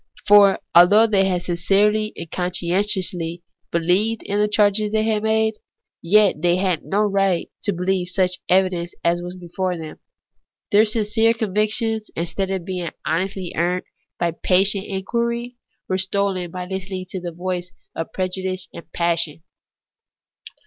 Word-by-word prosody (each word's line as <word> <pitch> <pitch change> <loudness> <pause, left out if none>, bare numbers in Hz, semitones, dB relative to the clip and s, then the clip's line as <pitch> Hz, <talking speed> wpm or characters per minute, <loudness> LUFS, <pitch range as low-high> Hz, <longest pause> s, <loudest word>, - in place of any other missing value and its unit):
For 205 -1 +7 0.2
although 200 +6 +7
they 200 -3 +2
had 180 -2 0
sincerely 205 +5 +1
and 165 - -8
con 180 -1 -1
scientiously 180 -2 -1 0.3
beheved 185 +7 +1
in 205 +1 -2
the 210 - +3
charges 210 0 +2
they 215 0 +1
had 220 -1 +1
made, 220 0 +1 0.4
yet 205 +3 +3
they 175 0 +3
had 185 -3 0
no 200 +2 0
right 195 -3 +1
to 205 - +2
believe 180 0 -1
on 185 - -7
such 180 -2 +1
evidence 180 -2 +1
as 175 +1 +1
was 175 +1 -7
before 180 0 -3
them. 160 -1 -8 0.7
Their 210 +1 +6
sincere 225 +1 +1
convictions, 220 +1 -1
instead 175 +3 -2
of 190 -3 -3
being 180 -3 -3 0.2
honestly 185 +2 -2
earned 175 +2 0 0.3
by 170 -1 0
patient 195 +4 +1
inquiring, 235 +5 -2 0.3
were 185 0 0
stolen 190 -1 -1
by 180 +1 -6
Hstening 190 0 -5
to 190 - -5
the 175 -1 -5
voice 180 +1 -4 0.2
of 165 - -4
prejudice 185 0 -3
and 170 - -11
passion. 165 -2 -1
190 Hz, 150 wpm, -21 LUFS, 175-210 Hz, 0.7 s, For